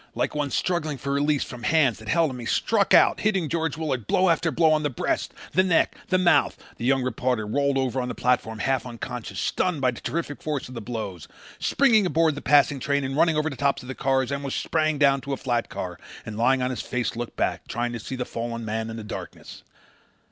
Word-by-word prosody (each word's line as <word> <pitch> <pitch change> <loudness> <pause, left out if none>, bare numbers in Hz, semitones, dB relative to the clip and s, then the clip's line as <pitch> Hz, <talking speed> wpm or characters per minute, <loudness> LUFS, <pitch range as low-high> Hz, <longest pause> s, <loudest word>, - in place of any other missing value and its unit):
Like - - -1
one 145 -1 -1
struggling 155 -1 -1
for 140 +2 -3
release 145 0 +1
from 125 -2 -9
hands 140 -6 +2
that 110 - -12
held 165 +2 +2
him 125 - -7
he 120 - -6
struck 210 -3 +1
out, - - +6
hitting 195 -6 +1
George 165 0 -1
Willard 135 -9 -2
blow 185 0 +3
after 165 0 +2
blow 160 +2 +3
on 155 -1 +3
the 145 - 0
breast, 130 - -2 0.2
the 185 - +4
neck, 185 -3 +2
the 185 - +2
mouth. 180 -1 +3 0.2
The 115 - -4
young 135 0 +3
reporter 125 -2 -1
rolled 140 +5 +1
over 130 -1 0
on 125 - -3
the - - -4
platform 120 -3 0
half 130 +4 0
unconscious, 125 -1 -6
stunned 180 -5 0
by 130 -2 +2
the 120 - -10
terrific 160 -3 -3
force 150 -3 -3
of 130 - -10
the 115 - -6
blows. 105 -7 -5 0.3
Springing 225 -8 +3
aboard 165 -2 +2
the 145 - -7
passing 145 -1 +4
train 140 +2 0
and 135 +1 -3
running 160 +1 +3
over 155 +1 +1
the - - -6
tops 140 -1 0
of 130 +1 -6
cars, 130 -1 +1
Elmer 140 0 -3
sprang 155 +2 0
down 140 -1 +4
to 140 - -4
a - - -2
flat 120 -3 -1
car 90 -1 -6 0.3
and 110 - -6
lying 125 +3 +2
on 125 - 0
his 125 - -3
face 125 -2 -2
looked 120 0 -5
back, - - -1
trying 120 0 -2
to 120 - -4
see 130 - -6
the 125 -1 -3
fallen 115 0 -5
man 110 +1 -3
in 110 - -6
the 110 - -6
darkness. 105 - -8
135 Hz, 235 wpm, -25 LUFS, 120-155 Hz, 0.3 s, out